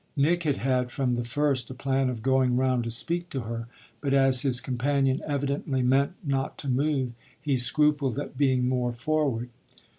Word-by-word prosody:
Nick 165 Hz, +5 st, +2 dB
had 150 Hz, -4 st, 0 dB
had 130 Hz, -2 st, 0 dB
from 125 Hz, 0 st, -1 dB
the 120 Hz, 0 st, -1 dB
first 135 Hz, +1 st, -1 dB
a 130 Hz, -, -7 dB
plan 135 Hz, 0 st, 0 dB
of 115 Hz, -3 st, -5 dB
going 130 Hz, -1 st, +2 dB
round 130 Hz, -2 st, +1 dB
to 115 Hz, -, -4 dB
speak 170 Hz, +9 st, 0 dB
to 135 Hz, -, -3 dB
her, 115 Hz, +1 st, -5 dB, 0.3 s
but 140 Hz, -1 st, +1 dB
as 135 Hz, -2 st, +5 dB
his 130 Hz, -3 st, +3 dB
companion 135 Hz, +1 st, 0 dB
evidently 140 Hz, -2 st, -1 dB
meant 135 Hz, +6 st, +2 dB
not 135 Hz, -3 st, -2 dB
to -, -, -7 dB
move 135 Hz, -1 st, 0 dB, 0.3 s
he 145 Hz, -1 st, 0 dB
scrupled 145 Hz, 0 st, +1 dB
at 145 Hz, -, -5 dB
being 130 Hz, -3 st, +2 dB
more 125 Hz, -1 st, 0 dB
forward. 125 Hz, -2 st, -1 dB
135 Hz, 180 wpm, -27 LUFS, 125-140 Hz, 0.3 s, as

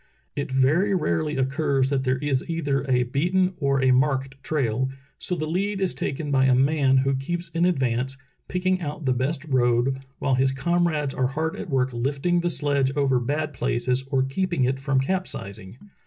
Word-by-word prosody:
It 140 Hz, -, -3 dB
very 150 Hz, +10 st, +2 dB
rarely 155 Hz, -3 st, 0 dB
occurs 135 Hz, 0 st, +1 dB
that 135 Hz, -1 st, 0 dB
there 130 Hz, 0 st, +1 dB
is 135 Hz, -1 st, -1 dB
either 145 Hz, -5 st, -1 dB
a 125 Hz, -1 st, +3 dB
beaten 180 Hz, +9 st, +1 dB
or 135 Hz, -1 st, +1 dB
a 130 Hz, -, +5 dB
marked 135 Hz, 0 st, +1 dB
trail, 130 Hz, -4 st, 0 dB, 0.3 s
so 180 Hz, -, 0 dB
the 155 Hz, -2 st, -2 dB
lead 195 Hz, +5 st, -1 dB
is 190 Hz, -2 st, 0 dB
taken 145 Hz, +1 st, -3 dB
by 135 Hz, -1 st, +4 dB
a 130 Hz, -1 st, +4 dB
man 135 Hz, 0 st, +3 dB
who 135 Hz, -, +2 dB
keeps 170 Hz, +6 st, -3 dB
in 170 Hz, +1 st, +1 dB
advance, 130 Hz, -5 st, 0 dB, 0.3 s
picking 185 Hz, 0 st, 0 dB
out 150 Hz, -1 st, -5 dB
the 130 Hz, -, +3 dB
best 135 Hz, +4 st, -2 dB
road, 130 Hz, -1 st, +2 dB, 0.2 s
while 135 Hz, -, 0 dB
his 130 Hz, +1 st, +3 dB
comrades 160 Hz, -2 st, 0 dB
are 130 Hz, -, +1 dB
hard 160 Hz, +4 st, -2 dB
at -, -, -7 dB
work 130 Hz, -2 st, +1 dB
lifting 140 Hz, +8 st, 0 dB
the 175 Hz, 0 st, 0 dB
sledge 140 Hz, -4 st, +1 dB
over 135 Hz, -3 st, +2 dB
bad 145 Hz, +5 st, -2 dB
places 125 Hz, +1 st, -1 dB
or 135 Hz, -2 st, +2 dB
keeping 170 Hz, +2 st, -1 dB
it 130 Hz, +1 st, 0 dB
from 135 Hz, -1 st, +1 dB
capsizing. 120 Hz, -, -4 dB
135 Hz, 185 wpm, -24 LUFS, 130-160 Hz, 0.3 s, a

